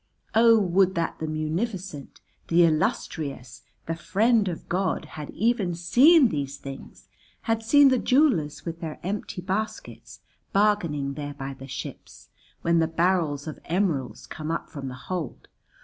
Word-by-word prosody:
"O 230 0 +6
would 190 -1 +2
that 170 -1 -2
the 160 - -3
Munificent, 160 - -4 0.3
the 170 +1 +5
Illustrious, 140 -5 -2 0.2
the 165 - -2
Friend 200 +6 +2
of 175 -3 -5
God, 185 +2 -1
had 150 -2 -8
even 215 -6 0
seen 255 - +6
these 140 -4 -3
things, 135 -1 -10 0.3
had 225 0 0
seen 280 +5 +6
the 260 -2 +2
jewellers 235 - +2
with 165 -1 -5
their 160 -2 -5
empty 190 0 -4
baskets, 200 +4 -5 0.3
bargaining 170 -9 +1
there 145 0 -6
by 135 0 -5
the 135 0 -11
ships, 135 - -8 0.3
when 170 0 +3
the 160 - +2
barrels 165 -3 0
of 155 - -7
emeralds 165 -7 -1
came 155 0 -7
up 165 - -3
from 140 -3 -6
the 130 - -6
hold. 175 -8 -5
170 Hz, 150 wpm, -25 LUFS, 150-205 Hz, 0.3 s, O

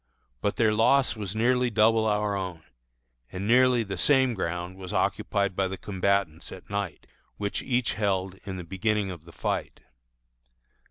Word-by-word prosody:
But 100 - 0
their 110 -2 +3
loss 130 +5 +3
was 105 -2 -5
nearly 125 +2 +2
double 110 0 +3
our 105 -1 +1
own, 90 -4 -5 0.7
and 95 +2 -4
nearly 125 0 +5
the 95 -3 -5
same 130 +5 +4
ground 90 -2 -3
was 95 -1 -7
occupied 100 -2 0
by 95 0 +1
the 95 +1 -5
combatants 95 -4 -1
at 95 +1 -11
night, 100 -5 -3 0.3
which 100 -1 -2
each 125 -2 0
held 95 -3 -1
in 95 -2 -5
the 90 - -6
beginning 95 +3 -1
of 85 -3 -10
the 85 - -13
fight. - - -3
100 Hz, 160 wpm, -27 LUFS, 95-110 Hz, 0.7 s, nearly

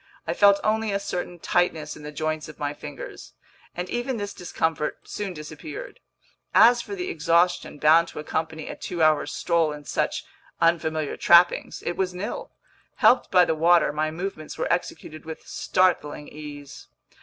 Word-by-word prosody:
I - - -1
felt 200 -1 +5
only 220 0 +1
a 200 - 0
certain 180 -2 -4
tightness 160 -3 0
in - - -12
the 150 0 -7
joints 155 +1 -3
of 155 - -11
my 145 0 -2
fingers, 145 -2 -9 0.4
and 180 +1 -3
even 240 +4 -2
this 205 -1 -4
discomfort 160 -3 -2
soon 205 -2 -4
disappeared. 310 - -8 0.6
As 240 +1 +7
for 400 - -6
the 365 -1 -4
exhaustion 170 - +1
bound 160 +3 +5
to - - -12
accompany 160 +1 -3
a - - -5
two 170 -2 -3
hour 155 -1 +3
stroll 170 -3 +1
in 150 -1 -9
such - - -1 0.3
unfamiliar 160 -3 +1
trappings—it 175 0 +4
was 185 -1 -1
nil. 190 +4 -5 0.5
Helped 255 - +4
by 180 -1 +6
the - - +1
water, 165 -1 +4
my 155 +1 0
movements 160 -1 -6
were - - +1
executed 155 -2 -4
with 160 0 -8
startling 165 -5 0
ease. 145 -2 -10
165 Hz, 160 wpm, -25 LUFS, 155-185 Hz, 0.6 s, As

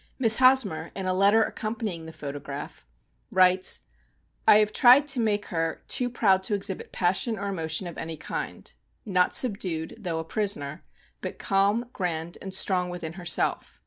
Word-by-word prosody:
Miss 225 -4 +6
Hosmer, 255 -12 +3
in 190 - -4
a 185 - 0
letter 200 +4 +4
accompanying 215 -9 -4
the - - -8
photograph, 145 - -8 0.4
writes; 185 0 +3 0.7
В«I 210 - +8
have 215 0 +2
tried 255 +3 +7
to 275 - -1
make 210 -2 0
her 165 -1 -2
too 250 -1 0
proud 195 -6 +2
to 205 +2 -1
exhibit 200 -1 -1
passion 190 +6 0
or 200 0 -4
emotion 165 -1 -2
of 175 - -7
any 160 0 -6
kind; - - -6 0.3
not 180 -4 +1
subdued, 185 -9 -1
though 175 -6 -3
a 160 - -3
prisoner; 165 -5 -3 0.4
but - - -6
calm, 200 +3 +1
grand, 170 -2 -4
and 190 - -7
strong 185 -1 +1
within 175 -2 -6
her 180 -1 -10
self. 170 - 0
190 Hz, 165 wpm, -26 LUFS, 165-215 Hz, 0.7 s, В«I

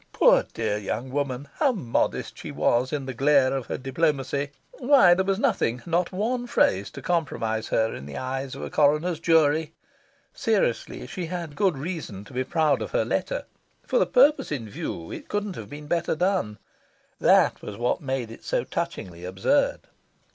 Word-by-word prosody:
Poor - - +5
dear 110 -2 0
young 120 +5 -4
woman, 140 -1 -2
how 280 - +4
modest 140 - -1
she - - -8
was 125 +2 +1
in 145 -3 -2
the 130 - -4
glare 135 +1 +3
of 135 -3 -4
her - - -3
diplomacy! 140 0 -1 0.3
Why 255 -9 +6
there 190 +2 +2
was 195 0 0
nothing, 195 - 0
not 170 +1 0
one 240 +6 -1
phrase, 100 - +2
to - - -9
compromise 115 -10 -1
her 110 0 +1
in 70 - -8
the 70 - -7
eyes 130 +1 -4
of - - -7
a - - -6
coroner's 150 +3 +2
jury!... 160 -1 +3 0.6
Seriously, 215 - 0
she 170 +6 -5
had 170 -4 -5
good 185 -2 +2
reason 145 - -5
to 130 - -14
be 130 +1 0
proud 155 -1 +1
of - - -3
her - - +2
letter. - - -2 0.4
For - - +2
the - - +3
purpose 305 - +4
in 125 -7 -3
view 85 -4 -6
it - - -8
couldn't 205 -2 -2
have 105 -3 -8
been 150 +1 -9
better 170 +1 0
done. 180 - 0 0.6
That - - +4
was 100 - -7
what 120 +1 0
made 130 -5 -3
it 115 - -12
so - - 0
touchingly 85 -2 -5
absurd. 95 +2 +1
145 Hz, 180 wpm, -25 LUFS, 120-180 Hz, 0.6 s, Why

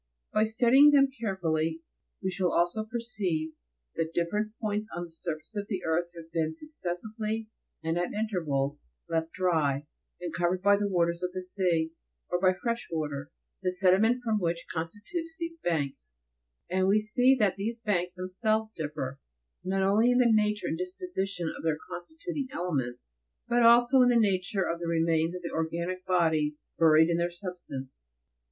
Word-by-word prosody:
By 215 +1 +4
studying 245 +6 +6
them 275 -2 +5
carefully 165 -9 -1 0.4
we 190 - 0
shall 180 -1 0
also 175 +5 +1
perceive 210 -9 -2 0.4
that 165 0 -3
different 210 +5 0
points 210 0 -2
on 175 - -3
the 170 - -9
surface 160 +3 -6
of 205 -1 -3
the 190 -4 -3
earth 160 +2 +1
have 165 -1 -11
been 160 -1 -1
successively, 215 - -4 0.3
and 165 +2 0
at 175 - -1
intervals, 150 - -1 0.2
left 165 0 -1
dry, 155 -6 +1 0.3
and 175 -2 -5
covered 175 +2 0
by 200 0 +6
the 205 0 0
waters 170 -2 +1
of 180 0 -2
the 185 - -4
sea, 175 -4 0 0.4
or 175 0 +1
by 185 -1 +6
fresh 230 +5 -3
water, 145 -3 -3 0.3
the 185 -1 0
sediment 195 +7 +3
from 220 -3 +1
which 170 -2 -1
constitutes 210 - -4
these 335 0 -5
banks, 145 - -2 0.6
and 185 +1 +1
we 205 +2 +5
see 245 +5 +3
that 205 -6 +2
these 225 +4 -2
banks 180 -5 -1
themselves 215 +4 -1
differ, 145 -3 -4 0.4
not 190 +1 0
only 210 +5 +4
in 245 - +4
the 250 - +5
nature 210 -1 +2
and 160 - -2
disposi 190 - -3
tion 175 -4 -3
of - - -8
their 160 -2 0
constituting 320 - -5
elements, 130 - -3 0.4
but 240 0 +3
also 240 +3 +6
in 250 - +6
the 245 - +4
nature 195 -3 +2
of 170 - -2
the 170 - -4
remains 165 0 +1
of 180 - -7
the 170 - -4
organic 170 +3 -2
bodies 160 -4 +1
buried 160 -1 +6
in 170 -1 +1
their 170 0 +1
substance. 170 - -7
180 Hz, 170 wpm, -29 LUFS, 165-215 Hz, 0.6 s, studying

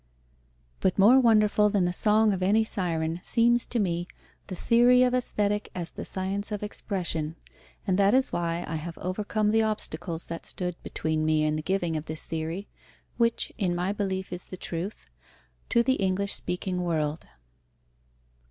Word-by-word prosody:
But 185 - +1
more 225 +7 +7
wonderful 215 -3 +4
than 200 -3 +1
the 175 - 0
song 215 +2 +3
of 190 - -3
any 205 +4 +3
Syren 165 -5 -1
seems 240 +2 +3
to 245 - -2
me 175 -4 -1 0.4
the 185 - -5
Theory 245 +6 +5
of 250 0 +2
Aesthetic 210 -4 -1
as 175 -2 -3
the - - -7
Science 195 +3 -3
of 210 0 -3
Expression, 170 -7 -3 0.5
and 190 0 +1
that 200 +3 +4
is 265 0 +3
why 170 0 -1
I 160 - -3
have 165 +2 -7
overcome 210 +3 -1
the 225 +1 +3
obstacles 175 -6 -2
that 165 0 -5
stood 180 -2 -4
between 155 0 -2
me 155 0 +2
and 155 0 +1
the 155 - -2
giving 175 -1 -1
of 155 0 -3
this 155 0 -6
theory, 165 +4 -4 0.5
which 235 -1 +1
in 180 -4 0
my 180 +2 -1
belief 190 -3 -3
is 180 - -6
the 185 - -9
truth, 175 +4 -5 0.6
to 235 - +3
the 260 +2 +2
English 195 +1 +1
speaking 180 0 -1
world. 160 -3 -2
190 Hz, 170 wpm, -27 LUFS, 170-210 Hz, 0.6 s, more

